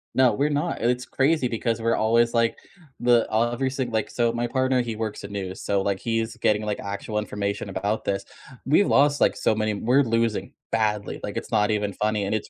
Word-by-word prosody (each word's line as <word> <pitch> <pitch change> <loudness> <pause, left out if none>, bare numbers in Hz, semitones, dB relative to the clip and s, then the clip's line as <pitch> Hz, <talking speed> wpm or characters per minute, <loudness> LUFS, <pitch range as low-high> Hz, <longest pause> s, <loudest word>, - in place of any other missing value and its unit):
No, 130 -2 +5
we're 145 +7 +1
not, 150 +4 -1
and 120 +1 +2
it's 125 +1 -3
crazy 140 -1 +1
because 115 -1 -2
we're 115 0 +2
always 115 +2 +2
like, 115 0 +2 0.4
the 120 -1 +3
uh, 115 +2 +2
every 130 +2 -1
single 130 -3 -3
like, 110 - -1
so, 120 -1 +1
my 120 +1 -2
partner, 130 +1 +1
he 115 -2 -4
works 110 -2 -4
at 100 - -7
news, 95 -2 -5
so, 100 -1 0
like, 100 -1 -1
he's 115 -1 -2
getting, 105 0 +2
like, 105 -1 -2
actual 100 +2 -4
information 100 -1 -3
about 100 +3 -2
this, 100 -1 -1 0.4
we've 155 +9 +4
lost, 145 +1 +3
like, - - +3
so 110 - +1
many 110 0 0
we're 125 +7 +3
losing 115 -2 -1 0.2
badly, 105 -2 -1
like, - - -5
it's - - -5
not 105 +1 +2
even 105 -2 -1
funny 105 0 0
and 105 - -1
it's 110 - -4
115 Hz, 220 wpm, -24 LUFS, 105-125 Hz, 0.4 s, No